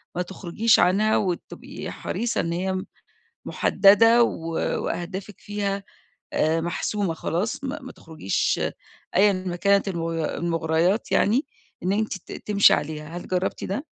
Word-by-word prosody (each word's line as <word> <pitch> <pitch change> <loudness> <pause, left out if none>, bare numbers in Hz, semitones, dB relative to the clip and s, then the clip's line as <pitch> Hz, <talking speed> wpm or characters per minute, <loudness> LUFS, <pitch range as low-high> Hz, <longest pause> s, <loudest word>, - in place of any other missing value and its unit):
ما 180 - 0
تخرجيش 190 +5 +1
عنها 205 +4 +3
وتبقي 180 -4 -4
حريصة 235 0 -2
إن 170 - -2
هي 185 +2 -2 0.6
محددة 225 +4 +5
و 165 -7 -2 0.4
وأهدافِك 190 +3 -5
فيها 200 -1 -3 0.5
آآ، 160 +1 +2
محسومة 180 +2 -1
خلاص، 180 - -2
ما 280 +3 -3
ما 260 - -9
تخرجيش 155 - -2 0.6
أيًا 205 +1 +5
ما 185 -1 -3
كانت 200 +2 +2
الم 170 -3 -2
المغريات 165 +3 0
يعني 240 +9 +3 0.4
إن 185 - +1
أنتِ 215 -1 -1
ت - - -14 0.2
تمشي 200 -1 +6
عليها، 155 +2 -3
هل - - -8
جربتِ 185 0 -1
ده؟ 210 +10 -3
190 Hz, 135 wpm, -24 LUFS, 170-210 Hz, 0.6 s, تمشي